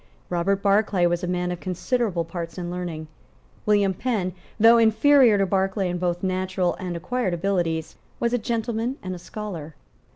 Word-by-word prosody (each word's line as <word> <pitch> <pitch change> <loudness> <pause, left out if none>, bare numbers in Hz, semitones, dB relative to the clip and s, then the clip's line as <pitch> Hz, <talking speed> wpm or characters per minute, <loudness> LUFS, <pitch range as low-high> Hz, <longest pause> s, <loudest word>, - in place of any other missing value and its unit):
Robert 190 +3 0
Barclay 200 -2 +3
was 175 +1 0
a - - -1
man 180 0 -1
of 175 - -4
considerable 185 -1 -1
parts 165 +1 -6
and 175 -1 -4
learning. 175 -3 -4 0.6
William 205 -2 +3
Penn, 195 -5 -1 0.3
though 230 +2 +7
inferior 230 +1 +5
to 195 - +2
Barclay 190 0 0
in 175 - -3
both 175 0 -1
natural 185 -1 0
and 180 -3 -4
acquired 185 +1 -1
abilities, 170 -3 -1 0.2
was 235 0 0
a 245 - +2
gentleman 230 +3 -2
and 185 -1 -4
a 180 - -7
scholar. 175 -5 -7
185 Hz, 165 wpm, -24 LUFS, 175-215 Hz, 0.6 s, though